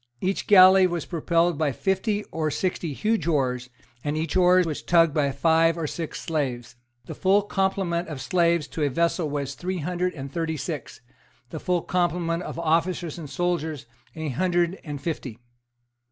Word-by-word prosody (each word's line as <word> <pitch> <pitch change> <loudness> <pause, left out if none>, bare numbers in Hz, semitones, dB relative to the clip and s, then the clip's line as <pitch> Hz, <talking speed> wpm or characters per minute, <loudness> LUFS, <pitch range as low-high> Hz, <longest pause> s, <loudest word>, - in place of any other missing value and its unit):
Each 190 +1 -2
galley 190 -1 +8
was 175 -2 -3
propelled 170 -1 +1
by 155 -3 +1
fifty 195 - -1
or 155 -1 -1
sixty 175 0 -2
huge 210 +2 -1
oars, 130 -5 0 0.3
and 150 +1 -2
each 160 +1 -2
oar 180 0 +5
was 155 -3 -3
tugged 165 -3 +3
by 145 -3 +1
five 165 +3 +3
or 165 - -2
six 160 +1 -5
slaves. 125 -7 -3 0.3
The - - -7
full 200 +2 +3
complement 190 -3 -1
of 150 -4 -6
slaves 170 0 +1
to 160 - -5
a 145 - +2
vessel 170 +3 0
was 140 -1 -3
three 185 +5 -4
hundred 180 +2 -2
and 140 -1 -7
thirty 165 -2 -2
six; 145 -1 -6 0.5
the 160 - -5
full 180 0 0
complement 175 -1 0
of - - -6
officers 170 0 0
and 150 -4 -8
soldiers 160 -5 -2 0.3
a 160 -1 -4
hundred 175 +5 0
and 145 -3 -6
fifty. 135 -7 -5
165 Hz, 170 wpm, -25 LUFS, 150-180 Hz, 0.5 s, galley